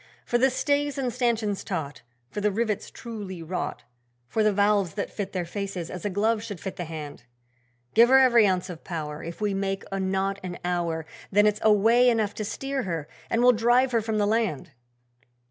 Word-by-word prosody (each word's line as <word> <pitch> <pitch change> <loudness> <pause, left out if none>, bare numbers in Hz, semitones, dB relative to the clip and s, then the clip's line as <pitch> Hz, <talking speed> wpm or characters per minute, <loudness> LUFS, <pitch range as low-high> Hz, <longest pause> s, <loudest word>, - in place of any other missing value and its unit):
'For 240 - +1
the 265 +2 +5
stays 285 +2 0
and 255 -3 -1
stanchions 230 -5 0
taut, 145 -9 -4 0.3
For 205 - -4
the 210 - +3
rivets 215 0 -1
truly 205 -7 -7
wrought, 180 +3 -4 0.4
For 220 - 0
the 215 0 +4
valves 200 -2 +2
that 205 - -3
fit 200 -2 -4
their 180 -2 -2
faces 190 -2 -5
as 180 - -7
a 205 - 0
glove 215 +3 +1
should 205 -5 -7
fit 190 - -6
the 175 - -4
hand. 150 -6 -8 0.7
Give 235 +2 +6
her 265 - +7
every 240 -5 +6
ounce 185 -1 0
of 175 -4 -9
power, 155 -3 -5
If 170 +4 -8
we 205 -1 +1
make 195 0 -2
a 195 - -2
knot 195 +1 -1
an 180 -1 -6
hour 170 -3 -1 0.3
Then 205 +1 +5
it's 210 0 +2
way 225 +4 +5
enough 220 -3 +1
to 215 - -4
steer 270 +6 -3
her 165 - -3 0.2
and 230 +1 +1
we'll 250 - +8
drive 245 +3 +3
her 230 -2 +2
from 220 0 -2
the 205 - +2
land.' 215 - 0
205 Hz, 200 wpm, -26 LUFS, 180-230 Hz, 0.7 s, we'll